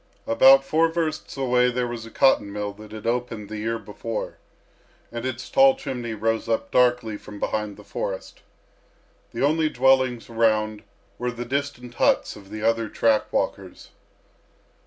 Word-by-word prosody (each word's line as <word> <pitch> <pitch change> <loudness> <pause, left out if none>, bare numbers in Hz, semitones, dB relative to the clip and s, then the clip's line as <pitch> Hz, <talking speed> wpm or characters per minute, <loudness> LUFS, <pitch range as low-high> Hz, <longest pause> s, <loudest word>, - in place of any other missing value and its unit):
About 135 +4 +6
four 160 +4 +3
versts 160 -3 -3
away 125 -2 +3
there 125 0 -1
was 120 -1 -6
a - - -10
cotton 110 -4 +3
mill 105 0 -4
that 105 +1 -13
had 110 0 -9
opened 115 -3 -2
the 110 -1 -5
year 115 +2 -1
before, 110 +1 -6 0.7
and 120 +2 -4
its 130 0 -5
tall 270 0 +5
chimney 125 - -5
rose 115 +1 -1
up 115 - -1
darkly 125 -4 +2
from 105 0 -11
behind 105 -1 -2
the - - -13
forest. - - -5 0.9
The - - -3
only 155 +1 +2
dwellings 130 -2 +2
around 110 -2 +1 0.4
were 125 - -1
the 120 0 -5
distant 130 -2 -3
huts - - +2
of 100 -2 -14
the 110 +1 -6
other 115 -1 +1
track 110 0 +1
walkers. - - -3
120 Hz, 155 wpm, -24 LUFS, 110-130 Hz, 0.9 s, About